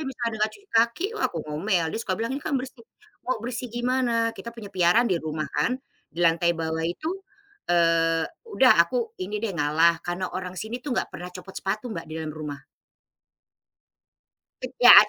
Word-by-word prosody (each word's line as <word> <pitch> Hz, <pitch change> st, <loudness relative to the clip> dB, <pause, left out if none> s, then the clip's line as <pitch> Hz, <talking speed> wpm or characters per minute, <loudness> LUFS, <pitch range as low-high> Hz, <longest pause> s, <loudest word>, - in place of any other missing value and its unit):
kalau 295 Hz, -, -3 dB
misalnya 240 Hz, -3 st, -2 dB
dia 220 Hz, -, -5 dB
enggak 215 Hz, 0 st, +2 dB
cuci 410 Hz, 0 st, -23 dB
kaki, 235 Hz, +8 st, +3 dB
wah 435 Hz, -, -2 dB
aku 170 Hz, -, -5 dB
ngomel 165 Hz, +4 st, 0 dB
dia -, -, -2 dB
suka 190 Hz, -5 st, -1 dB
bilang, 230 Hz, +3 st, -2 dB
"ini 275 Hz, -, -3 dB
kan 285 Hz, -1 st, -1 dB
bersih." 255 Hz, -1 st, -5 dB, 0.4 s
"Kok 255 Hz, -2 st, -1 dB
bersih 245 Hz, +1 st, -4 dB
gimana? 240 Hz, -1 st, +1 dB
Kita 235 Hz, -, -8 dB
punya 225 Hz, -4 st, -9 dB
piaraan 180 Hz, +6 st, +4 dB
di 185 Hz, -8 st, +1 dB
rumah 155 Hz, 0 st, -3 dB
kan, 150 Hz, +13 st, +1 dB, 0.3 s
di 170 Hz, +4 st, -1 dB
lantai 170 Hz, 0 st, +3 dB
bawah 160 Hz, 0 st, -2 dB
itu" 310 Hz, -, -3 dB, 0.5 s
eee, 165 Hz, -1 st, +3 dB, 0.2 s
udah 265 Hz, -, +6 dB
aku 230 Hz, +8 st, +1 dB
ini 200 Hz, +3 st, -3 dB
deh 215 Hz, -, -1 dB
ngalah, 160 Hz, +3 st, +3 dB
karena 175 Hz, +1 st, -2 dB
orang 180 Hz, -1 st, -4 dB
sini 225 Hz, +5 st, -4 dB
tuh 280 Hz, -, -2 dB
nggak -, -, 0 dB
pernah 180 Hz, 0 st, -6 dB
copot 190 Hz, +1 st, -10 dB
sepatu 205 Hz, +5 st, -2 dB
Mbak 165 Hz, -, -5 dB
di 155 Hz, -, -9 dB
dalam 155 Hz, -, -4 dB
rumah. 150 Hz, -2 st, -6 dB, 2.2 s
Ya, -, -, +11 dB
195 Hz, 185 wpm, -26 LUFS, 165-240 Hz, 2.2 s, Ya